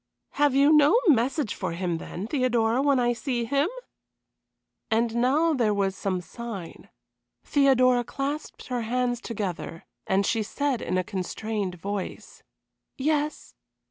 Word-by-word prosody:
"Have 285 -1 +2
you 285 +3 +5
no 300 +9 +6
message 265 -1 +2
for 185 -4 -4
him 170 -1 -2
then, 185 +4 -6
Theodora, 240 -2 +1
when 280 -2 +3
I 240 0 +2
see 240 -1 -2
him?" 280 +7 +1 1.2
And 225 +1 +1
now 285 +7 +3
there 225 -7 +1
was 195 -1 0
some 185 -2 -2
sign. 210 -3 -8 0.5
Theodora 255 -3 +4
clasped 280 +5 -5
her 250 -1 -1
hands 245 +1 -1
together, 190 -7 -5 0.2
and 195 +1 +2
she 225 +2 +1
said 265 +3 -1
in 185 - -1
a 185 - +1
constrained 195 +1 -3
voice: 200 +2 -6 0.6
"Yes. 300 +2 -1
240 Hz, 135 wpm, -26 LUFS, 200-275 Hz, 1.2 s, no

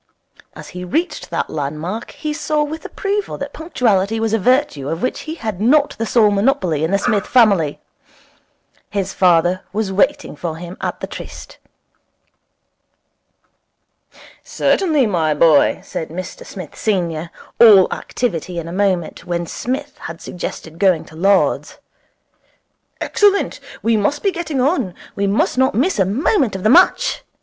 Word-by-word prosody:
As - - -10
he 180 - -7
reached 320 - -2
that - - -2
land 150 0 -3
mark 190 +9 -5
he 305 -1 -5
saw 300 0 0
with 310 +2 -6
approval 405 +1 -3
that - - -6
punctuality 225 - 0
was 225 -1 -1
a 225 - +2
virtue 245 - +1
of 165 +2 -3
which 255 - -1
he 320 - -3
had 215 - -5
not 285 +6 +3
the 225 - -1
sole 215 -3 +4
monopoly 200 - +1
in 160 - +1
the 200 - +2
Smith 205 -1 0
family. 200 - +3 1.1
His 195 -2 -2
father 180 0 +3
was 210 -1 -2
waiting 265 - +1
for 160 +1 -4
him 175 +2 -8
at - - -3
the - - -2
tryst. - - -10 2.8
'Certainly, 310 -9 +1
my 165 -7 +1
boy,' 155 -1 +4
said 160 - -5
Mr 180 +3 -7
Smith 180 -6 -9
senior, 170 -6 -1 0.3
all 210 -5 +8
activity 180 -7 -3
in 165 -1 -4
a 170 - -6
moment, 185 -3 -1
when 175 -1 -2
Psmith 270 - -4
had 165 0 -8
suggested 165 -2 -7
going 185 -5 +3
to 155 - -15
Lord's. 195 +4 +1 1.2
'Excellent. 405 -1 +2 0.2
We 230 0 +3
must 245 +8 0
be 395 - +2
getting 330 -6 -3
on. 255 - 0 0.2
We 200 0 0
must 205 +5 +1
not 260 -5 +2
miss 275 - +1
a 190 - +4
moment 245 - +1
of 190 - -5
the 215 - +3
match. 370 - +4
200 Hz, 155 wpm, -18 LUFS, 175-260 Hz, 2.8 s, all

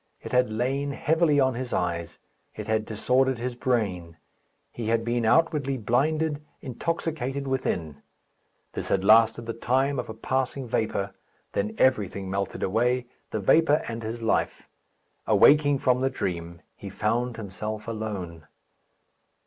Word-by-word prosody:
It - - -9
had 125 -1 +3
lain 130 +6 -1
heavily 160 -1 +2
on 130 -1 +3
his 125 +1 -5
eyes; 85 -2 -2 0.4
it - - -6
had 110 -1 0
disordered 130 +4 +1
his 125 +1 -3
brain. 100 -10 -1 0.5
He 115 -2 -5
had 115 0 +1
been 120 -1 0
outwardly 145 0 +2
blinded, 150 +6 0 0.2
intoxicated 140 -1 -3
within. 85 - -2 0.7
This - - -4
had 95 - +1
lasted 115 +2 +5
the 115 - -3
time 130 +4 0
of 125 - -5
a 110 - -6
passing 130 +2 -2
vapour. 100 -3 -1 0.4
Then 105 +2 -1
everything 100 -6 +1
melted 100 0 -2
away, 120 +5 +1 0.2
the 110 - -2
vapour 150 +9 +4
and 115 0 -4
his 115 +1 -5
life. 110 - 0 0.6
Awaking 145 -1 +5
from 125 -1 +2
the 135 - +2
dream, 85 -8 -4
he - - -8
found 120 0 -1
himself 105 +1 -5
alone. 100 -8 -5
120 Hz, 140 wpm, -26 LUFS, 105-135 Hz, 0.7 s, lasted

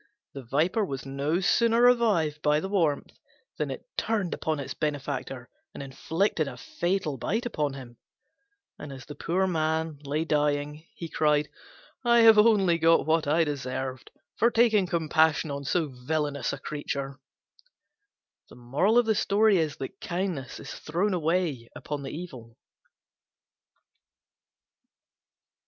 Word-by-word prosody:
The 135 - -7
Viper 155 - 0
was 135 -9 -5
no 140 +6 -1
sooner 230 +4 +3
revived 205 -12 +3
by 150 0 +3
the 190 - -4
warmth 170 -8 -1 0.4
than - - -1
it - - -7
turned 205 -6 -1
upon 155 -2 -2
its 140 - -5
benefactor 140 -4 -4 0.3
and - - -6
inflicted 160 +4 -1
a 125 -3 -7
fatal 175 -1 -2
bite 225 - -1
upon 150 - -2
him; 120 -3 -11 0.8
and 150 - -8
as 130 -2 -10
the 145 - -8
poor 175 +6 0
man 160 -3 -1
lay 150 +3 -2
dying, 150 0 -1
he 175 -7 -6
cried, 150 -2 +1 0.5
"I 235 -1 +5
have 225 -1 +8
only 200 -6 +4
got 165 +1 +4
what 160 -1 +1
I 160 +3 +3
deserved, 130 -3 -4 0.3
for 235 - +4
taking 225 -5 +3
compassion 160 -2 +2
on 140 0 -5
so 160 +2 0
villainous 140 +1 -2
a 140 - -4
creature." 140 -1 -5 1.3
Kindness 185 - 0
is - - -8
thrown 180 +6 -1
away 160 -8 -1
upon 145 -1 -5
the 135 - -6
evil. 130 -9 -9
155 Hz, 125 wpm, -27 LUFS, 140-185 Hz, 1.3 s, have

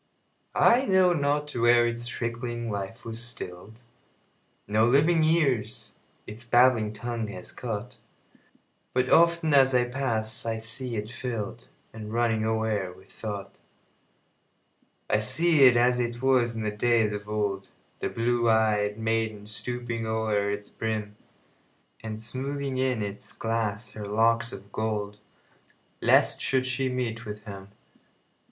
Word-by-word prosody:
I 255 +3 +4
know 185 -2 +4
not 145 -1 0
where 120 -1 +4
its 120 0 -2
trickling 120 -1 -4
life 100 +3 -5
was 115 +1 -5
still'd; 110 -1 -8 0.8
No 110 +2 +2
living 150 +7 +4
ears 135 -10 0 0.3
its 110 +3 -8
babbling 120 -3 +4
tongue 115 0 -4
has 90 -3 -7
caught; 120 +1 -5 1.0
But 130 0 +1
often, 170 -2 +4
as 135 -2 +5
I 125 - +4
pass, 115 -4 -2
I 115 -1 -2
see 115 +2 -5
it 105 0 -4
fill'dAnd 120 -2 -5 0.4
running 115 -1 +1
o'er 110 -4 0
with 95 +1 -17
thought.I 100 - -8
see 140 +6 +4
it 125 -2 +7
as 125 +1 +3
it 120 0 -2
was 125 -3 +2
in 110 - -3
days 115 -1 +3
of 105 0 -6
old, 100 -2 -2 0.3
The - - -2
blue 120 0 +1
ey'd 105 -2 +2
maiden 110 -2 -1
stooping 115 +1 -4
o'er 110 -2 0
its 100 0 -5
brim, 110 -2 -3 0.9
And 110 -1 -5
smoothing 135 +3 -3
in 130 -4 0
its 100 0 -6
glass 115 -2 -2
her 105 -1 -7
locks 115 +2 +2
of 100 +1 -10
gold, 105 -2 -3 0.8
Lest - - +4
she 130 -1 +1
should 130 0 -1
meet 120 -2 -3
with 105 -2 -7
him. 100 -1 -9
115 Hz, 130 wpm, -27 LUFS, 105-125 Hz, 1.0 s, it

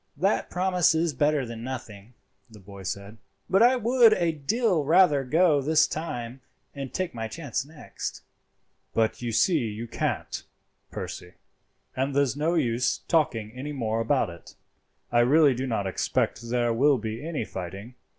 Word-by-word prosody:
"That 195 +3 +1
promise 180 -2 +2
is 160 -1 +1
better 145 0 +1
than 115 -1 -7
nothing," 115 -3 -8 0.3
the 110 - -14
boy 100 0 -12
said; 100 +3 -6 0.3
"but 195 +2 +3
I 245 +2 +6
would 240 -1 +5
a 170 -5 +1
deal 175 - 0
rather 155 -2 +4
go 155 +2 +3
this 155 +3 +4
time 130 -5 -5 0.3
and 135 -2 -6
take 185 -2 -3
my 115 -1 -4
chance 140 -1 -4
next." 150 +1 -8 0.7
"But 110 +1 +1
you 120 -1 -2
see 160 - +3
you 115 0 -4
can't, - - -3 0.5
Percy, 90 - -7 0.6
and 135 +1 -1
there's 140 -2 +2
no 160 +4 0
use 120 -6 0
talking 115 -10 +1
any 135 +5 -6
more 115 -4 -1
about 115 -4 +1
it. 85 - -14 0.6
I 120 - +3
really 140 +4 +5
do 130 +2 -3
not 110 -5 -1
expect 115 +4 -1
there 120 -1 +1
will 140 +4 +4
be 110 +2 -5
any 155 -7 -3
fighting. 95 +6 -7
135 Hz, 160 wpm, -26 LUFS, 115-160 Hz, 0.7 s, I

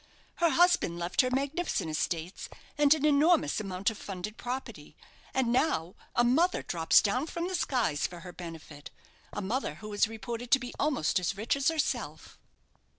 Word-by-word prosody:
"Her 340 -1 +3
husband 345 - +3
left 175 +2 +1
her 255 - 0
magnificent 275 - -1
estates, 165 +3 -3 0.3
and 290 -1 +3
an 305 -1 -1
enormous 305 +1 +3
amount 195 0 -1
of 215 - -10
funded 195 +2 -6
property; 250 +3 -6 0.4
and 260 -3 +1
now 195 - +1 0.2
a 240 - +4
mother 310 +10 +2
drops 165 -2 +3
down 250 +8 0
from 340 +1 -3
the 375 - -4
skies 240 - 0
for 175 -1 -11
her 180 0 -9
benefit 160 -4 -9 0.4
a 205 - -4
mother 215 - -2
who 210 +5 -9
is 205 - +3
reported 230 +2 -6
to 270 - +6
be 245 -1 -7
almost 275 - +1
as 180 +2 -2
rich 220 +6 0
as 275 0 0
herself." 320 -3 -2
235 Hz, 170 wpm, -30 LUFS, 180-280 Hz, 0.4 s, to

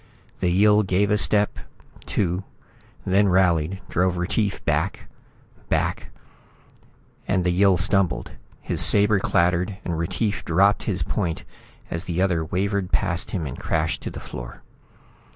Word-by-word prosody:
The 90 - +1
Yill 105 +4 +4
gave 100 +1 +1
a 105 - +3
step, 105 -1 +2 0.5
two, 90 0 -1 0.6
then 100 +2 +3
rallied, 90 -1 +1
drove 90 0 0
Retief 100 +3 -2
back, 85 +3 -1 0.6
back - - -1 1.2
And 95 -2 +1
the 90 - +1
Yill 95 +1 +3
stumbled. 95 +1 +1 0.3
His - - +1
sabre 105 0 +5
clattered, 90 +2 +1
and 85 - -2
Retief 100 +5 -2
dropped 100 +5 +2
his 95 -4 -1
point 85 -6 -3 0.5
as 85 +2 -4
the 85 -1 -3
other 90 -4 +1
wavered 95 +3 -2
past 95 -3 -1
him 90 -6 -3
and 65 - -7
crashed 80 0 -1
to - - -5
the - - -8
floor. - - -9
95 Hz, 135 wpm, -23 LUFS, 85-100 Hz, 1.2 s, sabre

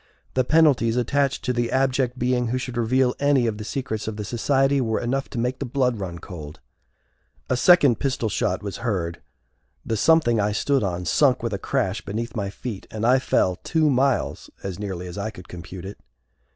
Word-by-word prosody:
The 130 - +2
penalties 135 -6 +3
attached 135 +3 0
to 125 - +1
the 120 -1 -1
abject 130 -1 +1
being 125 0 +1
who 125 +3 -1
should 125 -1 -5
reveal 125 +2 +2
any 140 -3 +3
of 110 -2 -2
the - - -5
secrets 110 -2 -4
of 110 -1 -4
the 105 - -4
society 135 +4 +2
were 110 -3 0
enough 135 +3 -2
to 130 - -7
make 125 +2 -1
the 140 - -3
blood 125 -3 0
run 90 -3 -5
cold. 80 -4 -9 0.9
A - - +4
second 145 -3 +5
pistol 130 -5 -1
shot 105 - -1
was 100 -2 -5
heard, 90 -8 -2 0.6
the 115 - -1
something 120 -2 +3
I 105 0 +1
stood 140 +5 +1
on 90 -3 -2
sunk 130 - +3
with 115 -3 -2
a 100 - -2
crash 95 +2 -1
beneath 115 +2 -4
my 100 -3 -2
feet 105 0 -7
and 110 0 -3
I 130 +2 +5
fell 90 -7 +1
two 155 - +1
miles, 135 0 0
as 95 -1 -5
nearly 95 -4 -4
as 90 +2 -7
I 105 +2 -2
could 90 -4 -12
compute 90 +1 -9
it. 100 - -8
120 Hz, 200 wpm, -24 LUFS, 100-130 Hz, 0.9 s, second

